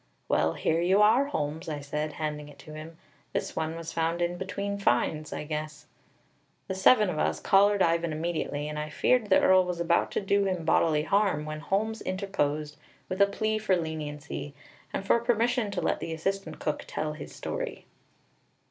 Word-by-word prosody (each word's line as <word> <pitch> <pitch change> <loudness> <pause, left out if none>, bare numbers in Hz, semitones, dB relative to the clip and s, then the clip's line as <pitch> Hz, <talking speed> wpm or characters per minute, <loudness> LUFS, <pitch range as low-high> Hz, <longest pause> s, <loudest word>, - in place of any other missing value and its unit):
"Well, 80 - +2
here 165 +1 0
you 185 +3 +3
are, 235 +6 +5
Holmes," 160 - -3
I 150 -2 -3
said, 150 +2 -3
handing 150 -1 -4
it 145 - -14
to 155 - -10
him. 155 +1 -9 0.4
"This - - -2
one 160 0 -2
was 165 -1 -6
found 165 +1 0
in 175 0 0
between 200 +2 -4
finds, 155 -1 +1
I - - -4
guess." 150 -1 -5 0.8
The - - -2
seven 210 +3 +5
of 165 -4 -2
us - - 0
collared 200 0 +4
Ivan 170 0 +1
immediately, 155 -2 -2
and 150 0 -4
I 150 0 -4
feared 225 +7 +2
the 190 - +6
Earl 185 0 +5
was 180 -1 -4
about 170 0 +2
to - - +1
do 200 0 +2
him 185 -4 -1
bodily 160 -1 +3
harm, 195 -5 +1
when 155 0 -5
Holmes 220 +6 -1
interposed 150 -6 -2 0.3
with 185 +1 -1
a 200 - +7
plea 215 +2 -1
for 215 -3 +2
leniency, 150 -3 -5 0.4
and 195 - -3
for 235 - +4
permission 235 -1 +1
to 200 - -3
let - - 0
the 165 - -4
assistant 190 -1 -3
cook 150 -1 -3
tell 155 0 -3
his 155 - -9
story. - - -5
170 Hz, 185 wpm, -28 LUFS, 155-200 Hz, 0.8 s, a